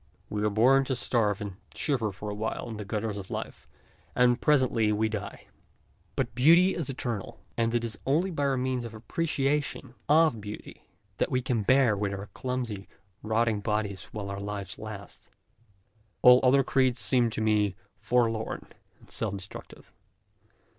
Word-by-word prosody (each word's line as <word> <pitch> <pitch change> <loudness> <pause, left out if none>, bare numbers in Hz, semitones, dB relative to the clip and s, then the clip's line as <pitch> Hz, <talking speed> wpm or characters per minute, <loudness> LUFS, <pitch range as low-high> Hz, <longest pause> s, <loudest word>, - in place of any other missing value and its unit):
We 105 0 -1
are 105 - +3
born 125 +6 +5
to 130 - -1
starve 110 -4 +1
and 100 -3 -6 0.2
shiver 120 -8 0
for 105 +2 -6
a - - -3
while 110 +2 -3
in 110 - -6
the 105 - -6
gutters 105 0 -2
of 95 -2 -8
life - - -6 0.5
and 125 0 +4
presently 130 -7 +3
we 110 +1 +1
die. 105 -2 -6 0.7
But - - -1
beauty 170 +9 +6
is 160 -6 -3
eternal, 120 -6 -4 0.2
and 115 0 +1
it 120 - +1
is 110 -3 -4
only 165 +8 +2
by 140 -4 0
means 130 -1 -1
of 115 -1 -7
our - - -7
appreciation 140 0 -1 0.2
of 155 -7 +4
beauty 105 +1 -9 0.3
that - - +1
we 125 0 0
can 120 -4 0
bear 130 0 +4
with 100 0 -2
our 100 +1 -8
clumsy, 120 -6 -4 0.3
rotting 110 0 +1
bodies 105 -2 -2
while 100 -2 -6
our 100 - -4
life 100 -1 -5
lasts. 105 -2 -9 0.9
All 125 0 +9
other 135 +1 +5
creeds 130 -2 +2
seem 120 +4 +2
to 110 - -4
me 105 -3 +2 0.2
forlorn 115 0 0 0.3
and - - -19
self 105 -3 -2
destructive. 95 +1 -11
115 Hz, 165 wpm, -28 LUFS, 105-130 Hz, 0.9 s, All